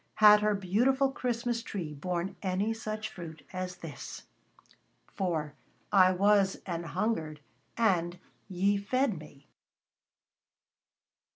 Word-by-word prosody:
Had 210 -1 +8
her 210 0 +2
beautiful 245 +9 +2
Christmas 240 -2 -2
tree 175 -9 -5
borne 175 +5 -3
any 195 +3 0
such 215 -1 -4
fruit 160 -5 -9
as 185 -1 -4
this? 165 -4 -8 0.9
"For 160 -6 -2 0.4
I 185 -2 +6
was 195 +1 +3
an 170 -3 -3
hungered 165 -4 -2 0.4
and 180 -6 +2 0.3
ye 195 +2 +2
fed 220 - 0
me." 145 -2 -14
195 Hz, 105 wpm, -30 LUFS, 175-215 Hz, 0.9 s, Had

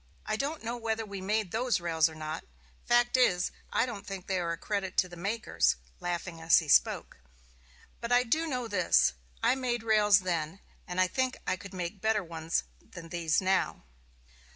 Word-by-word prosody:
I 215 - -1
don't 285 +6 -3
know 235 +2 -3
whether 225 -1 -2
we 200 -2 -7
made 210 -1 0
those 240 +1 +1
rails 165 -2 +2
or 160 - -11
not; 155 0 -5 0.4
fact 240 +1 +4
is, 185 -8 +3 0.2
I - - +2
don't 230 -5 -6
think 195 -2 -7
they 190 -1 -1
are 170 -1 -1
a 170 - -3
credit 195 0 -3
to 185 - +4
the 175 - -11
makers 200 - +1 0.2
[laughing 175 -1 -4
as 165 +1 +6
he 160 - +1
spoke]. 145 - +3 0.8
But 235 +1 -5
I 245 0 +5
do 315 +7 0
know 250 -5 -2
this: 180 - +3 0.3
I - - +5
made 245 -3 -2
rails 210 -3 +5
then, 170 -1 -2 0.3
and 180 +1 -3
I 185 - +6
think 260 +7 -1
I - - +1
could 195 +1 -10
make 180 +2 -5
better 220 -2 +1
ones 165 -1 -2 0.2
than 165 -2 -11
these 165 -1 +1
now." 190 0 0
195 Hz, 190 wpm, -30 LUFS, 175-230 Hz, 0.8 s, as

